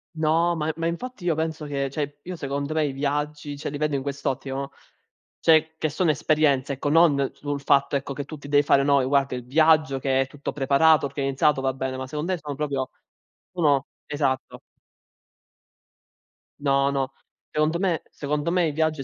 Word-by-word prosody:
No, 165 +2 +2
ma 155 -2 -2
e - - -1
ma 165 - -3
infatti 185 +4 -4
io 170 - +3
penso 160 0 -3
che 140 -2 -2
cioè, 145 +1 -4
io 180 +4 -6
secondo 140 0 -3
me 155 -1 +2
i 145 - -1
viaggi 145 +1 -3
cioè 140 - -5
li 145 - -5
vedo 150 -1 0
in 135 - -2
quest'ottica, 140 -1 -3
no: 135 +1 -3 0.7
cioè, 160 0 +4
che 155 - 0
sono 165 +3 +1
esperienze, 145 -2 +2
ecco, 140 +2 -2
non 145 -4 +4
sul 145 -1 -4
fatto, 140 0 +3
ecco, 140 0 -3
che 140 +1 -5
tu 155 - -8
ti 140 - -11
devi 145 0 +4
fare, 140 -1 +4
no, 140 0 +4
ehm, 130 - 0
guarda 140 -1 +2
il 125 - -7
viaggio 155 0 +3
che 135 0 +1
è - - -3
tutto 140 +2 -6
preparato, 145 +2 +4
organizzato, 135 0 +1
va 135 0 +1
bene, 130 0 -4
ma 130 0 -5
secon 150 +4 -4
me 185 0 0
sono 145 -2 -6
proprio 140 -3 -2 0.6
o 180 -2 -3
no? 140 -3 +3 0.2
Esatto. 140 -3 -2 2.0
No, 140 -1 +2
no, 135 -1 -1 0.4
secondo 155 +2 +1
me 180 -4 0
secondo 150 +2 -2
me 175 -2 +2
i - - -1
viaggi 155 -1 0
145 Hz, 195 wpm, -24 LUFS, 140-155 Hz, 2.0 s, cioè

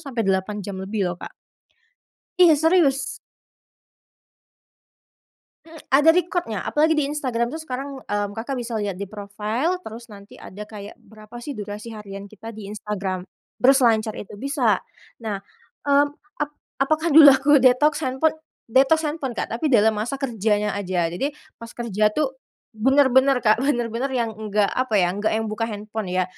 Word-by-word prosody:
sampai 235 -4 -2
8 195 +1 -1
jam 190 -2 -6
lebih 190 -2 -2
loh, 175 - -11
Kak. - - -8 1.1
Iya, 335 -4 +7
serius. 295 -4 +2 2.5
Mmm, 320 -1 -12 0.2
ada 295 +4 +7
record-nya, 345 - 0
apalagi 315 +2 +3
di 285 - +2
Instagram 255 -5 -1
tuh, 320 - -5
sekarang, 270 -1 -6
mmm, 205 0 -3
Kakak 245 +4 -4
bisa 235 -1 -5
lihat 200 -3 -3
di 200 - -4
profile, 215 - -2
terus 230 +1 -9
nanti 200 0 -13
ada 210 +2 -10
kayak 205 -1 -10
berapa 220 +2 -13
sih 275 +3 -6
durasi 210 +2 -7
harian 200 -1 -8
kita 215 +2 -10
di 215 -2 -9
Instagram, 200 -3 -4 0.4
berselancar 235 -5 +4
itu 205 - -9
bisa. 245 -3 0 0.4
Nah, 210 -3 -3 0.5
mmm, 285 +1 +4 0.3
ap 295 - -3 0.3
apakah 310 +2 +1
dulu 300 -3 +11
aku 275 +2 +2
detox 265 +4 +4
handphone 265 +5 +1 0.3
detox 275 +7 +3
handphone, 295 -6 -4
Kak. - - -3
Tapi 295 +6 -1
dalam 220 -3 +4
masa 235 +6 -3
kerjanya 210 -5 0
aja, 185 -4 -1
jadi 175 - -2 0.3
pas 230 - -9
kerja 215 -3 0
tuh, 270 +2 -1 0.4
bener-bener 265 +3 +4
Kak, 215 +2 +4
bener-bener 240 -2 0
yang 230 -2 -1
enggak 210 -1 0
apa 255 -4 0
ya, 180 -2 +3
enggak 210 +3 0
yang 225 - -1
buka 220 +1 -3
handphone 210 -1 -5
ya. 185 0 +1
230 Hz, 155 wpm, -23 LUFS, 210-275 Hz, 2.5 s, dulu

